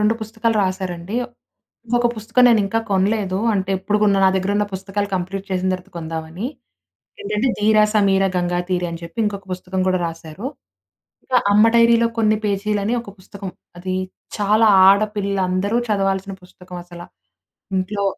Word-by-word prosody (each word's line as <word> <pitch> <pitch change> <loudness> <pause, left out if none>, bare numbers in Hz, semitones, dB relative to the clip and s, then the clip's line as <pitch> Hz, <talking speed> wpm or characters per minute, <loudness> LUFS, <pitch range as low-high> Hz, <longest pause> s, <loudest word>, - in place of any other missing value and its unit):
2 210 +2 +3
పుస్తకాలు 220 +1 -1
రాసారండి. 185 +1 -4 0.8
ఒక 240 - 0
పుస్తకం 225 +3 +1
నేను 225 -2 +5
ఇంకా 225 +3 0
కొనలేదు. 195 0 +1 0.2
అంటే, 195 -1 -1
ఎప్పుడు 205 +3 0
కొన్నా 200 -2 +3
నా - - +6
దగ్గర 190 +1 0
ఉన్న 210 - +2
పుస్తకాలు 195 +2 -3
వ్కంప్లీట్ 190 +1 -3
చేసిన 185 0 0
తర్వాత 185 +1 -7
కొందామని. 165 +5 -5 0.8
ఏంటంటే 255 - -1
'ధీర 215 +1 +3 0.2
సమీర 195 -2 +3
గంగాతీర' 175 0 -1
అని 170 0 -7
చెప్పి 170 +6 -8
ఇంకొక 200 -2 -4
పుస్తకం 185 +1 -4
కూడా 185 -1 +2
రాశారు. 165 +5 -7 0.8
ఇంకా 255 - 0 0.2
'అమ్మ 210 +2 +6
డైరీలో 230 0 +5
కొన్ని 215 -1 +3
పేజీలని' 205 +2 0
ఒక 200 - -11
పుస్తకం. 195 0 -8 0.3
అది 185 +1 -3 0.4
చాలా 210 +2 +3 0.2
ఆడపిల్లలు 200 -1 +2
అందరూ 200 +5 0
చదవాల్సిన 195 -1 0
పుస్తకం 180 0 -12
అసల. 175 -1 -11 0.8
ఇంట్లో 200 +2 -2
195 Hz, 145 wpm, -20 LUFS, 185-210 Hz, 0.8 s, నా